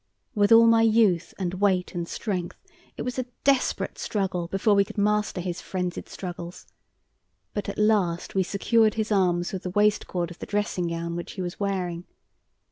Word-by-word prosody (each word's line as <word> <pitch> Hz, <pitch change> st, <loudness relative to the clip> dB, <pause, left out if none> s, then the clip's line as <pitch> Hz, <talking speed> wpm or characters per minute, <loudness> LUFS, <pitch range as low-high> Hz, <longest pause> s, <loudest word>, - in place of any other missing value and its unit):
With 205 Hz, -2 st, +2 dB
all 230 Hz, 0 st, +9 dB
my 230 Hz, 0 st, +5 dB
youth 215 Hz, -6 st, +3 dB
and 180 Hz, -2 st, -2 dB
weight 190 Hz, -3 st, +2 dB
and 170 Hz, -2 st, -3 dB
strength, 185 Hz, -4 st, -4 dB, 0.4 s
it -, -, -3 dB
was 250 Hz, +1 st, -3 dB
a 255 Hz, -, -3 dB, 0.2 s
desperate 275 Hz, -2 st, +1 dB
struggle 185 Hz, -4 st, -2 dB
before 195 Hz, +4 st, +2 dB
we 200 Hz, 0 st, +5 dB
could 200 Hz, -, -11 dB
master 210 Hz, -1 st, +1 dB
his 180 Hz, 0 st, -4 dB
frenzied 180 Hz, -2 st, -4 dB
struggles; 175 Hz, -1 st, -7 dB, 0.9 s
but 205 Hz, -1 st, -3 dB
at -, -, -6 dB
last 205 Hz, -5 st, +1 dB
we 195 Hz, -, +2 dB
secured 215 Hz, +3 st, +2 dB
his 220 Hz, 0 st, -2 dB
arms 180 Hz, -3 st, +1 dB
with 190 Hz, -, -3 dB
the 180 Hz, -, -4 dB
waist 210 Hz, +2 st, +2 dB
cord 175 Hz, -2 st, -2 dB
of 175 Hz, -, -12 dB
the -, -, -7 dB
dressing 205 Hz, -4 st, -1 dB
gown 170 Hz, 0 st, -3 dB
which 175 Hz, -, -6 dB
he 190 Hz, -, -5 dB
was 175 Hz, 0 st, -6 dB
wearing. 180 Hz, -4 st, -2 dB
195 Hz, 185 wpm, -26 LUFS, 175-210 Hz, 0.9 s, all